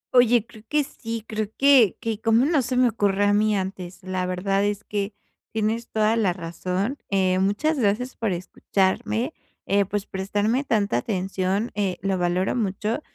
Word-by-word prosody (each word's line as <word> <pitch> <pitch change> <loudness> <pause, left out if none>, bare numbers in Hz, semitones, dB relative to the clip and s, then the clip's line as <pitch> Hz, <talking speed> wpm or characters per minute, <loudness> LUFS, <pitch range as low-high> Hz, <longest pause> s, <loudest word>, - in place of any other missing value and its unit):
Oye, 240 -2 +5
creo 215 -2 -15
que 300 -1 +2
sí, 225 -4 -6
creo 215 -1 -2
que 270 -8 +5
que 225 -1 -3
cómo 225 +3 +4
no 305 -3 +3
se 250 +1 -2
me 250 -1 +5
ocurrió 205 -2 +1
a 205 - +3
mí 210 0 +3
antes. 185 -1 -5
La 185 -1 -2
verdad 195 +2 0
es 205 +1 -1
que 205 0 -3 0.4
tienes 220 +2 -1
toda 215 +1 +2
la 195 -6 +2
razón. 185 - -3
Eh, 185 -2 +2
muchas 210 +11 +1
gracias 240 +3 0
por 220 -4 -1
escucharme, 190 - -1 0.3
eh, 200 0 +2
pues 205 +1 -3
prestarme 205 +7 -1
tanta 205 - +1
atención, 190 - -1
eh, 195 -3 -1
lo 195 -2 0
valoro 180 +2 +1
mucho, 215 +3 -1
205 Hz, 170 wpm, -24 LUFS, 190-230 Hz, 0.4 s, Oye